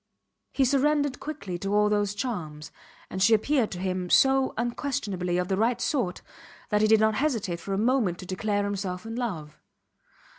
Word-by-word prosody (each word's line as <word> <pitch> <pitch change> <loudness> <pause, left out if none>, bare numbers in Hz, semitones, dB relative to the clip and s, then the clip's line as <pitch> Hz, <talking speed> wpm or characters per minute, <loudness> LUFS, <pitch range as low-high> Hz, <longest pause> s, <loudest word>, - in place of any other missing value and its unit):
He 270 - +2
surrendered 285 +1 +1
quickly 200 - -6
to 195 +3 -1
all 210 0 +4
those 205 -1 0
charms, 160 - -5 0.4
and 190 - -4
she 225 +3 +6
appeared 245 +1 +1
to 180 - -6
him 185 -1 -2
so 270 +3 +4
unquestionably 225 -7 -2
of 180 0 -1
the 190 - 0
right 230 +3 +1
sort 235 - -1 0.5
that 210 -1 +2
he 215 - +4
did 220 0 +5
not 220 0 +3
hesitate 220 - -1
for 195 +3 -3
a - - -2
moment 225 -5 +1
to 185 - -9
declare 205 +2 -1
himself 195 -1 -3
in 225 0 -5
love. 170 -12 -4
210 Hz, 180 wpm, -27 LUFS, 185-245 Hz, 0.5 s, she